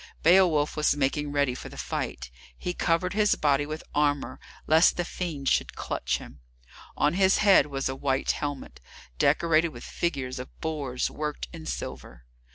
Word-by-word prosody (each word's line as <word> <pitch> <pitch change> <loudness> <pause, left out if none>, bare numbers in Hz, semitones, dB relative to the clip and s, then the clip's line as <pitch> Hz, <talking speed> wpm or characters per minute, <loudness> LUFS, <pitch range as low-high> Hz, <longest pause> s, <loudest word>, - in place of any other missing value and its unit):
Beowulf 165 -4 +4
was 150 -1 +2
making 145 +1 0
ready 140 -3 +1
for - - -8
the - - -12
fight. 60 -1 -4 0.3
He 180 - -3
covered 175 +2 0
his 210 0 +3
body 145 -1 +1
with 155 +1 -6
armour 145 -1 0 0.3
lest 160 +2 +5
the 175 - -1
fiend 160 -7 -5
should - - +1
clutch - - -2
him. - - -12 0.6
On 150 - +2
his 190 +1 +4
head 195 -8 +5
was 135 -1 -2
a 130 - -3
white 135 0 0
helmet, 145 - -5 0.4
decorated 165 0 +3
with 120 -6 -11
figures 135 -7 -3
of 125 - -10
boars 145 -6 -2
worked 150 0 -4
in 160 -2 -9
silver. - - -6
150 Hz, 165 wpm, -27 LUFS, 135-170 Hz, 0.6 s, lest